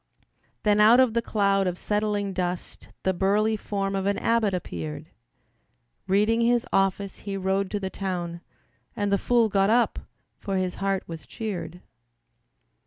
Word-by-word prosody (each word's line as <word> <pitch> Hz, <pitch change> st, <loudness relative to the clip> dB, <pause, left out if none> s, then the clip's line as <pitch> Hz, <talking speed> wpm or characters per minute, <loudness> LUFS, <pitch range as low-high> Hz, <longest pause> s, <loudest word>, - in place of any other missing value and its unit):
Then 210 Hz, -1 st, +3 dB
out 220 Hz, +4 st, +7 dB
of 255 Hz, -4 st, +4 dB
the 235 Hz, -, +1 dB
cloud 200 Hz, -3 st, +1 dB
of 180 Hz, -1 st, -2 dB
settling 210 Hz, -1 st, -1 dB
dust 180 Hz, -1 st, -4 dB, 0.2 s
The 190 Hz, -, +2 dB
burly 205 Hz, +4 st, +2 dB
form 200 Hz, -2 st, -3 dB
of 195 Hz, 0 st, -1 dB
an 200 Hz, -, +1 dB
abbot 230 Hz, -3 st, +2 dB
appeared, 80 Hz, -, -5 dB, 1.0 s
Reading 210 Hz, +4 st, +3 dB
his 240 Hz, +1 st, +2 dB
office 195 Hz, 0 st, 0 dB
he 200 Hz, -1 st, -5 dB
rode 190 Hz, 0 st, 0 dB
to 205 Hz, -, -2 dB
the 190 Hz, -1 st, -4 dB
town. 175 Hz, -3 st, -4 dB, 0.5 s
And 205 Hz, -1 st, 0 dB
the 200 Hz, -, +3 dB
fool 240 Hz, -2 st, +3 dB
got 195 Hz, -1 st, +2 dB
up, 235 Hz, +2 st, +2 dB, 0.4 s
for 195 Hz, -1 st, -2 dB
his 185 Hz, -1 st, -1 dB
heart 195 Hz, -1 st, 0 dB
was 165 Hz, -1 st, -9 dB
cheered. 190 Hz, -6 st, -5 dB
200 Hz, 155 wpm, -26 LUFS, 190-215 Hz, 1.0 s, out